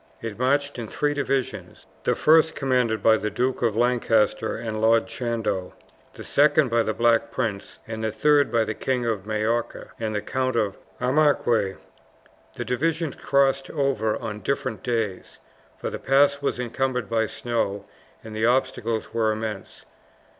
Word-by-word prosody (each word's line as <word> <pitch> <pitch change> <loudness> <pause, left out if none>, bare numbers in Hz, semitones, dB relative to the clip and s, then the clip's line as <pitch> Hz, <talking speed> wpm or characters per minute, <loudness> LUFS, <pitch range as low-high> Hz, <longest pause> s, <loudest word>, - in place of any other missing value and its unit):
It 115 -1 -6
marched 140 +1 +1
in 115 - -5
three 145 +6 -1
divisions, 130 -9 -3 0.2
the - - +2
first 160 +1 +4
commanded 125 -5 0
by 110 -1 +6
the 105 - -2
Duke 125 +5 -1
of 115 -3 +1
Lancaster 120 -2 +1
and 110 -1 -4
Lord 115 0 +4
Chandos, 115 -5 -3 0.4
the - - -9
second 150 -1 +3
by 115 0 +3
the 110 - 0
Black 115 -1 +3
Prince, 105 -6 -3
the 110 -1 -3
third 145 +6 +3
by 115 -1 +3
the 110 - -3
King 125 +1 -1
of 105 -4 -2
Majorca 110 +2 -2
and 110 -2 -2
the - - +1
Count 130 +2 -1
of 105 -4 0 0.2
Armaguac. 125 -7 +2 0.8
The - - -5
divisions 160 +4 -1
crossed 135 -1 +1
over 135 -8 0
on 110 -3 -5
different 140 +2 -2
days, 115 -6 -3 0.4
for - - -4
the - - -5
pass 140 +1 +3
was 140 - -1
encumbered 125 -1 -1
by 110 0 +1
snow 115 -5 -2 0.4
and 110 -1 -9
the 110 +1 +1
obstacles 120 -3 0
were 110 -1 +2
immense. 110 -2 -6
120 Hz, 155 wpm, -24 LUFS, 110-135 Hz, 0.8 s, by